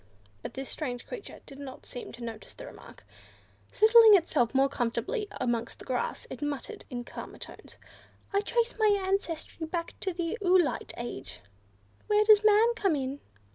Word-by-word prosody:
But - - -7
this 270 0 -5
strange 250 -6 -5
creature 470 -5 -9
did 275 0 -12
not 270 -2 -9
seem 245 - -8
to 235 - -9
notice 225 -2 -8
the - - -9
remark. - - -13 0.7
Settling 440 0 +8
itself 275 - +1
more 270 +1 +5
comfortably 275 - -2
amongst 235 -2 -1
the - - -12
grass, 250 -2 -2
it 260 - -7
muttered 290 -3 -4
in 245 -2 -4
calmer - - -9
tones, - - -10 0.6
"I 400 - +3
trace 470 +3 0
my 420 -2 +4
ancestry 340 -4 -2
back 335 +1 -3
to 380 - -2
the 345 +5 -3
oolite 365 -4 +2
age. 235 - -7 0.7
Where 420 0 +4
does 425 -1 +7
man 430 +2 +5
come 390 -8 +1
in?" 270 0 -3
330 Hz, 165 wpm, -29 LUFS, 255-415 Hz, 0.7 s, Settling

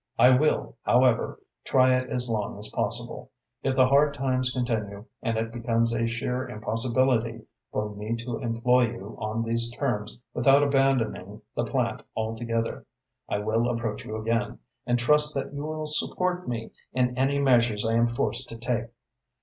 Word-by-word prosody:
I 125 - +7
will, 125 - +1
however, - - +2 0.2
try 130 -1 +4
it 130 0 0
as 125 0 0
long 105 -3 -2
as 105 +1 -4
possible. - - -3 0.3
If 135 -1 0
the 130 0 +6
hard 140 +2 +4
times 130 -2 0
continue, 110 -5 -3 0.2
and 115 -3 -1
it 115 0 -2
becomes 115 0 0
a 115 0 0
sheer 125 +2 -2
impossibility 115 +1 0 0.3
for 105 0 -2
me 105 +3 -3
to 115 0 -5
employ 120 +1 +2
you 110 -3 -9
on 110 +1 -2
these 115 +1 +1
terms 120 -4 -3
without 135 +4 +5
abandoning 135 -4 0
the - - 0
plant - - -1 0.2
altogether, 115 +1 -2 0.5
I - - 0
will 110 +3 0
approach 115 -3 -3
you 110 - -6
again, 115 +2 -1 0.3
and 120 0 +2
trust 150 +5 +4
that 135 +1 -3
you 145 +1 -4
will 155 0 -4
support 180 +4 +2
me 115 -2 -4 0.2
in 125 -1 +1
any 135 +2 +1
measures 120 -6 +3
I 115 - +1
am 115 +1 +4
forced 120 +1 -2
to 115 - -6
take. 120 0 -2
120 Hz, 165 wpm, -26 LUFS, 115-130 Hz, 0.5 s, I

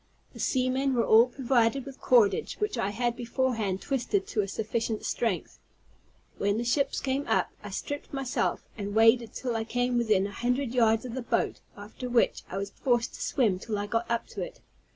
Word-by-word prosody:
The - - -12
seamen 260 +1 +1
were 235 - +2
all 225 +3 +7
provided 250 0 +1
with 275 -1 -10
cordage, 240 - +3
which 420 0 -2
I 195 - 0
had 240 +3 -1
beforehand 230 -5 -1
twisted 275 - 0
to 215 - +1
a 195 - -3
sufficient 220 +2 -2
strength. 225 -6 -2 0.8
When 200 +1 +1
the 235 - -1
ships 275 +4 +1
came 275 +1 -2
up, - - +1
I - - -8
stripped 290 -1 -5
myself, 270 -2 -1
and 205 -1 -5
waded 225 +1 +5
till 245 -3 -3
I 225 - 0
came 245 +2 0
within 215 -5 +2
an 200 - -4
hundred 250 +4 -1
yards 225 -2 +3
of 245 - -6
the 260 - -3
boat, 235 - -1 0.2
after 215 +5 -7
which 240 -1 +2
I 185 - -4
was 200 0 -3
forced 240 -3 0
to - - -9
swim 210 -9 +1
till 215 +1 -3
I 205 - -2
got 230 +3 -1
up 235 0 0
to - - -6
it. - - -6
235 Hz, 195 wpm, -28 LUFS, 220-255 Hz, 0.8 s, all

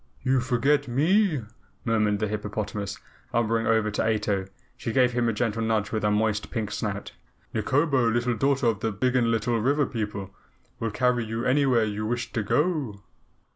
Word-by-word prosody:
"You 130 0 +3
forget 135 +4 +1
me," 155 - +2 0.4
murmured 105 -3 +2
the 105 +1 -1
hippopotamus. 105 -1 -4 0.4
Lumbering 115 0 +1
over 110 -1 +2
to 105 - 0
Ato, 105 -3 0 0.3
she 115 - -4
gave 125 0 +4
him 120 -1 +1
a - - +2
gentle 115 0 -1
nudge 110 -2 0
with 110 - -1
her 105 - +2
moist 105 0 0
pink 110 -3 -3
snout. - - -3 0.4
"Nikobo, 135 -4 +2
Little 120 +1 +1
Daughter 135 +1 +1
of 115 -3 +2
the 110 +1 -1
Biggenlittle 115 0 +1
River 140 +3 +3
People, 105 -5 -4 0.5
will 115 - -1
carry 125 +2 +1
you 115 +1 -3
anywhere 130 -3 +3
you 105 0 -2
wish 120 +1 -3
to 115 - 0
go." 135 - 0
115 Hz, 165 wpm, -26 LUFS, 105-130 Hz, 0.5 s, gave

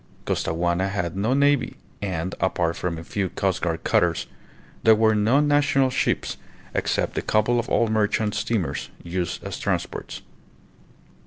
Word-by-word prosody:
Costaguana 85 +3 0
had 95 -3 -2
no 110 +7 +1
navy, 140 0 +2 0.3
and, 95 -2 -2
apart 85 -3 0
from 85 -2 -3
a 80 - -7
few 95 +2 -2
coastguard 90 -3 -1
cutters, - - +2 0.6
there 110 0 +6
were 110 0 +4
no 110 +6 +3
national 145 -2 +3
ships 130 - 0 0.4
except - - 0
a - - -2
couple 110 +3 +2
of 120 - -3
old 115 -2 +2
merchant 105 0 +1
steamers 105 -3 -2
used 85 0 -3
as - - -5
transports. - - -3
105 Hz, 140 wpm, -24 LUFS, 90-115 Hz, 0.6 s, there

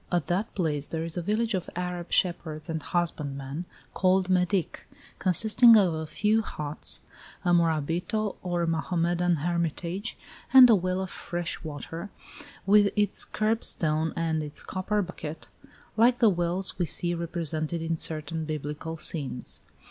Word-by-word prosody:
At 175 -5 +1
that 185 +7 -2
place 150 -6 -1
there 160 -1 -3
is 165 -1 -6
a 175 - -1
village 215 +5 0
of 185 -2 -2
Arab 180 -1 -4
shepherds 165 -3 0
and 160 -1 -3
husbandmen, 145 -2 -2 0.3
called 185 0 +2
Medick, 180 0 0 0.3
consisting 220 +5 +6
of 185 -5 +3
a 160 0 -4
few 215 +7 +2
huts, 150 -7 -3 0.4
a 175 - +3
morabito 170 +6 +1
or 175 -1 -1
Mohammedan 170 +1 +1
hermitage, 170 +5 -2 0.3
and 260 -1 +10
a - - +7
well 185 0 -1
of 190 - -5
fresh 175 -1 -4
water, 165 +5 -6 0.6
with 205 +1 +5
its 210 -1 +1
curb 220 +2 -1
stone 155 0 +1
and 160 -1 0
its 150 -1 -6
copper 205 +2 -1
bucket, 165 -3 -8 0.5
like 235 +2 +4
the 230 - +5
wells 175 +1 -1
we 175 - +1
see 175 +4 0
represented 165 -1 -3
in 165 -1 -2
certain 160 0 -1
biblical 155 +1 -4
scenes. 145 -5 -3
175 Hz, 145 wpm, -27 LUFS, 160-190 Hz, 0.6 s, and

